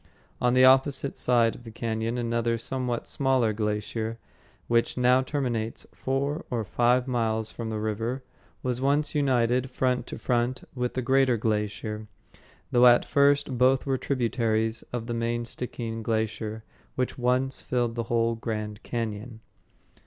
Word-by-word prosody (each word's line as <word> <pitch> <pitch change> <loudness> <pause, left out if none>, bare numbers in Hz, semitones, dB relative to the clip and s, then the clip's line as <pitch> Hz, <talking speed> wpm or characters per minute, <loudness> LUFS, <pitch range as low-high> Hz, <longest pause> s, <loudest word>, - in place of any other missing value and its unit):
On 125 0 +3
the 130 0 +7
opposite 135 +1 +4
side 120 -2 +3
of 120 - -13
the 115 - -9
cañon 115 +1 -2
another 115 0 0
somewhat 125 0 -3
smaller 130 -5 +2
glacier, 105 +1 -2 0.5
which 115 +1 +1
now 125 +1 +4
terminates 125 -5 -2
four 140 +3 -2
or 120 -3 -1
five 125 +4 +2
miles 110 -3 0
from 115 -1 -5
the 110 - -2
river, 115 +5 -2 0.4
was 125 -1 -1
once 145 +2 +2
united 130 -3 +2
front 125 -1 0
to - - -6
front 120 +1 0
with 125 -2 -2
the 130 - -1
greater 130 -1 +3
glacier, 105 0 -2 0.6
though 125 0 +6
at 120 0 +6
first 140 -2 +2
both 130 +1 +4
were 135 -2 0
tributaries 115 -3 0
of 120 -2 -3
the 120 - -3
main 115 0 -1
Stickeen 115 -1 -5
Glacier 110 0 -2 0.3
which 130 0 -2
once 125 +2 +1
filled 120 -2 -1
the 115 0 -3
whole 115 0 +2
grand 105 -2 -4
cañon. 115 0 -4
120 Hz, 145 wpm, -27 LUFS, 115-130 Hz, 0.6 s, the